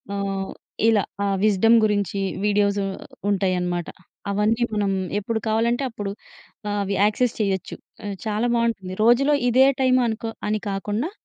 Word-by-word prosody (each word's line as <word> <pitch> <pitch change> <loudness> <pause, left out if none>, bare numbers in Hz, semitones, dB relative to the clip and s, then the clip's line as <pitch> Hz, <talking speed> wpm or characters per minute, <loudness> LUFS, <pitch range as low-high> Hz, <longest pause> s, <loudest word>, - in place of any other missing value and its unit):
ఆహ్, 195 -1 -3 0.4
ఇలా. 210 -3 +3 0.2
ఆహ్, 195 -1 +1
విజ్‌డమ్ 215 +2 +5
గురించి 205 -1 0 0.3
వీడియోసు 205 -1 +2 0.5
ఉంటాయన్నమాట. 180 -3 0 0.4
అవన్నీ 215 +4 +1
మనం 205 -2 +1 0.3
ఎప్పుడు 220 +2 -2
కావాలంటే 235 +4 +1
అప్పుడు 205 -3 -5 0.7
అవి 200 0 -1
యాక్సెస్ 220 +3 +1
చేయొచ్చు. 195 -3 -1 0.5
చాలా 215 +2 0
బావుంటుంది. 225 -6 -1
రోజులో 275 +5 +4
ఇదే 260 +3 +6 0.2
టైం 255 -1 +4
అనుకో 225 0 -3 0.2
అని 215 0 0
కాకుండా 205 - -2
210 Hz, 125 wpm, -23 LUFS, 195-230 Hz, 0.7 s, ఇదే